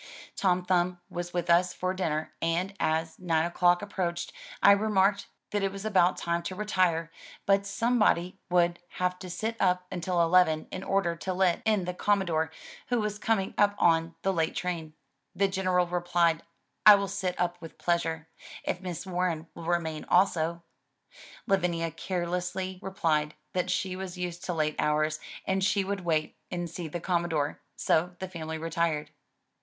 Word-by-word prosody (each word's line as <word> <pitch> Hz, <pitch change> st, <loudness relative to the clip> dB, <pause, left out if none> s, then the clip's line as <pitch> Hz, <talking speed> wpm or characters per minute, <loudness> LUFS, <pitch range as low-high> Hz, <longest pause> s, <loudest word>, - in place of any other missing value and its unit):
Tom 180 Hz, -2 st, +1 dB
Thumb 180 Hz, -1 st, +1 dB
was 175 Hz, 0 st, -4 dB
with 175 Hz, -1 st, -2 dB
us 175 Hz, +1 st, +4 dB
for 185 Hz, 0 st, -1 dB
dinner 160 Hz, -4 st, -2 dB
and 170 Hz, +4 st, 0 dB
as 160 Hz, +1 st, 0 dB
nine 165 Hz, -3 st, +1 dB
o'clock 175 Hz, +1 st, +3 dB
ap 205 Hz, -, -9 dB
proached, 175 Hz, -2 st, -2 dB, 0.3 s
I 200 Hz, -, +7 dB
remarked 200 Hz, -1 st, +3 dB, 0.2 s
that 205 Hz, -, 0 dB
it 195 Hz, 0 st, 0 dB
was 195 Hz, +1 st, -7 dB
about 185 Hz, -4 st, +3 dB
time 170 Hz, 0 st, -1 dB
to 185 Hz, +2 st, -5 dB
retire, 185 Hz, -5 st, +1 dB, 0.3 s
but 200 Hz, 0 st, +3 dB
some 235 Hz, +4 st, +1 dB
body 180 Hz, -4 st, +2 dB
would 175 Hz, -1 st, +3 dB
have 180 Hz, 0 st, -1 dB
to 185 Hz, -, -8 dB
sit 220 Hz, +6 st, -3 dB
up 180 Hz, -1 st, +2 dB
until 180 Hz, 0 st, -1 dB
eleven, 165 Hz, -2 st, +3 dB
in 185 Hz, -, -5 dB
order 195 Hz, -4 st, +1 dB
to 185 Hz, +2 st, -3 dB
let 180 Hz, -2 st, +2 dB
in 210 Hz, -4 st, +2 dB
the 180 Hz, -, -2 dB
Com 200 Hz, +2 st, +2 dB
modore, 160 Hz, -3 st, 0 dB, 0.4 s
who 245 Hz, -1 st, +1 dB
was 210 Hz, -1 st, -2 dB
coming 220 Hz, -4 st, 0 dB
up 205 Hz, 0 st, +4 dB
on 165 Hz, -1 st, +3 dB
the 195 Hz, -, +2 dB
late 165 Hz, -2 st, 0 dB
train. 165 Hz, -4 st, -3 dB, 0.4 s
The 195 Hz, -, +3 dB
General 185 Hz, -2 st, +1 dB
replied 175 Hz, -2 st, +1 dB, 0.2 s
" -, -, -49 dB
I 210 Hz, -, +11 dB
will 200 Hz, 0 st, -1 dB
sit 190 Hz, -2 st, -3 dB
up 175 Hz, -1 st, -1 dB
with 165 Hz, -, -10 dB
pleasure, 165 Hz, -2 st, -1 dB, 0.4 s
if 180 Hz, -, -2 dB
Miss 175 Hz, -2 st, -5 dB
Warren 175 Hz, -3 st, -1 dB
will 165 Hz, -, -9 dB
remain 165 Hz, -3 st, -1 dB
also." 170 Hz, -2 st, +2 dB, 0.8 s
Lavinia 170 Hz, -4 st, +1 dB
carelessly 180 Hz, +2 st, -3 dB
replied 155 Hz, -6 st, 0 dB, 0.2 s
that 180 Hz, 0 st, 0 dB
she 185 Hz, 0 st, -1 dB
was 185 Hz, -1 st, -6 dB
used 175 Hz, -1 st, -4 dB
to 180 Hz, -, -1 dB
late 155 Hz, -1 st, 0 dB
hours 155 Hz, +1 st, +1 dB, 0.3 s
and 190 Hz, 0 st, 0 dB
she 200 Hz, +1 st, +2 dB
would 195 Hz, 0 st, -3 dB
wait 155 Hz, -3 st, 0 dB
and 175 Hz, -1 st, -3 dB
see 170 Hz, 0 st, -6 dB
the 170 Hz, +3 st, -4 dB
Commodore, 170 Hz, -4 st, -1 dB
so 175 Hz, +2 st, +1 dB
the 190 Hz, -, -5 dB
family 160 Hz, -3 st, -5 dB
retired. 165 Hz, -1 st, -1 dB
180 Hz, 175 wpm, -29 LUFS, 165-190 Hz, 0.8 s, I